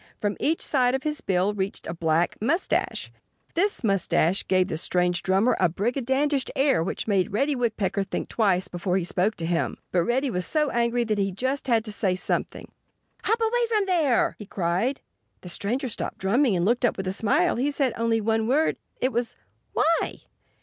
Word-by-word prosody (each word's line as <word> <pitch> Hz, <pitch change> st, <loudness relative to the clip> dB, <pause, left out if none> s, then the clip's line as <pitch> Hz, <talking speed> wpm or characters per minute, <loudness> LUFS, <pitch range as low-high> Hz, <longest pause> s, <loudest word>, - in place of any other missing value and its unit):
From 205 Hz, -1 st, -1 dB
each 320 Hz, +2 st, 0 dB
side 255 Hz, -2 st, +2 dB
of 265 Hz, -, -3 dB
his 300 Hz, 0 st, -2 dB
bill 190 Hz, +2 st, +1 dB
reached 195 Hz, -1 st, -3 dB
a -, -, -4 dB
black 165 Hz, 0 st, +1 dB
mustache. 320 Hz, -, 0 dB, 0.4 s
This 390 Hz, -3 st, 0 dB
mustache 195 Hz, -3 st, +2 dB
gave 185 Hz, -1 st, +3 dB
the 175 Hz, -, -3 dB
strange 180 Hz, 0 st, +1 dB
drummer 195 Hz, +6 st, +2 dB
a 180 Hz, -, +4 dB
brigandish 265 Hz, -, 0 dB
air 270 Hz, -, +3 dB
which 185 Hz, -, -4 dB
made 195 Hz, -4 st, +1 dB
Reddy 275 Hz, +8 st, +1 dB
Woodpecker 220 Hz, -5 st, -1 dB
think 195 Hz, -, -3 dB
twice 195 Hz, -4 st, +1 dB
before 180 Hz, 0 st, -1 dB
he 185 Hz, -, 0 dB
spoke 190 Hz, +5 st, 0 dB
to 165 Hz, -, -4 dB
him. 170 Hz, 0 st, -1 dB
But 180 Hz, -, +3 dB
Reddy 260 Hz, +2 st, +1 dB
was 180 Hz, -3 st, -1 dB
so 300 Hz, -3 st, +1 dB
angry 235 Hz, 0 st, +1 dB
that 215 Hz, -2 st, -1 dB
he 195 Hz, -1 st, +1 dB
just 260 Hz, +8 st, -2 dB
had 230 Hz, -3 st, +2 dB
to 215 Hz, -, -5 dB
say 195 Hz, -3 st, 0 dB
something. 180 Hz, -, -3 dB, 0.5 s
"Hop 450 Hz, +2 st, +2 dB
away 470 Hz, +1 st, +1 dB
from 425 Hz, -3 st, +2 dB
there!" 320 Hz, -10 st, +2 dB
he 210 Hz, -, -9 dB
cried. 190 Hz, +10 st, -1 dB, 0.4 s
The 180 Hz, -, -9 dB
stranger 235 Hz, +9 st, -2 dB
stopped 230 Hz, -, -4 dB
drumming 225 Hz, +4 st, +2 dB
and 175 Hz, 0 st, +1 dB
looked 235 Hz, +4 st, +1 dB
up 240 Hz, -, +2 dB
with 190 Hz, -, -4 dB
a 185 Hz, -, -1 dB
smile. 295 Hz, -, +2 dB
He 265 Hz, +4 st, +1 dB
said 275 Hz, -4 st, 0 dB
only 230 Hz, 0 st, +1 dB
one 220 Hz, +1 st, 0 dB
word. 295 Hz, +6 st, +2 dB, 0.2 s
It 255 Hz, -, +2 dB
was 235 Hz, +1 st, -1 dB, 0.4 s
"Why?" 330 Hz, +1 st, +1 dB
225 Hz, 190 wpm, -25 LUFS, 190-270 Hz, 0.5 s, a